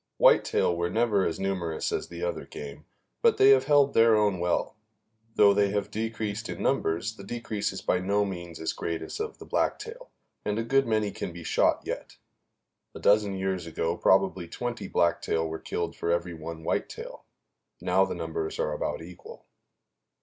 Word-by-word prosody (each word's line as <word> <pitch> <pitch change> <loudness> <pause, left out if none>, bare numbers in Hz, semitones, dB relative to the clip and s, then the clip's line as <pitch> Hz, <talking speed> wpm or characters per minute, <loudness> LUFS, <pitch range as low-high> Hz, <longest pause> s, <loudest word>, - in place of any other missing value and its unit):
Whitetail 85 - +4
were 85 +1 -1
never 105 -1 +2
as 80 - -3
numerous 90 -5 -2
as - - -2
the 85 0 -7
other 85 - -2
game, 75 0 -9 0.4
but - - +4
they 135 +1 +7
have 135 -1 +5
held 145 -1 +4
their 115 0 +6
own 105 -4 +2
well. 85 0 0 0.6
Though 100 -1 +6
they 100 0 +3
have 100 0 -2
decreased 110 -1 -3
in - - -5
numbers, 85 +8 0
the 100 - -10
decrease 110 -1 -3
is - - -7
by 90 - +2
no 100 +2 +1
means 85 -4 -6
as 80 - -2
great 85 -1 -3
as - - -7
of 440 +1 -4
the - - -11
blacktail, - - -2 0.3
and 105 0 -1
a 115 - 0
good 135 +3 +2
many 110 -2 +1
can - - -5
be 85 0 -9
shot - - +2
yet. - - -6 0.8
A - - -7
dozen 105 -1 +3
years 95 -3 -2
ago 80 +1 -1
probably 95 -1 +2
twenty 120 +3 -4
blacktail 85 -2 +1
were 80 0 -5
killed 85 -1 -3
for 85 - -3
every 85 0 -1
one 80 0 -7
whitetail; 485 - -3 0.6
now - - +3
the - - -2
numbers 410 0 -4
are - - -1
about - - -3
equal. 460 +2 -12
100 Hz, 180 wpm, -28 LUFS, 85-115 Hz, 0.8 s, they